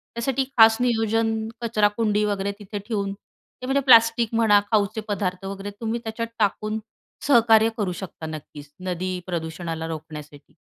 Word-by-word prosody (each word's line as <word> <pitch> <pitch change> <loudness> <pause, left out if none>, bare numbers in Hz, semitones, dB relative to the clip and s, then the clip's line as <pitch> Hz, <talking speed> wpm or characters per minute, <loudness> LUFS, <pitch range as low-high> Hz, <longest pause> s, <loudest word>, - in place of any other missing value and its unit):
त्यासाठी 265 +3 0
खास 225 -1 +7
नियोजन 225 -2 +1 0.3
कचरा 215 -3 +2
कुंडी 210 -2 +1
वगैरे 200 -1 -1
तिथे 205 0 -6
ठेऊन 200 -3 -2
ते 215 +4 -16
म्हणजे 270 +2 +1
प्लास्टिक 230 -3 +5
म्हणा 220 -3 +5
खाऊचे 215 0 +1
पदार्थ 195 -2 -2
वगैरे 195 +1 -6
तुम्ही 230 +1 -2
त्याच्यात 225 +1 -4
टाकून 215 +1 0 0.5
सहकार्य 225 -4 +5
करू 200 -4 -1
शकता 175 -4 -8
नक्कीचं. 150 -2 -9 0.2
नदी 180 +1 -3
प्रदूषणाला 165 -1 -4
रोखण्यासाठी. 150 -2 -9
210 Hz, 140 wpm, -24 LUFS, 185-225 Hz, 0.5 s, खास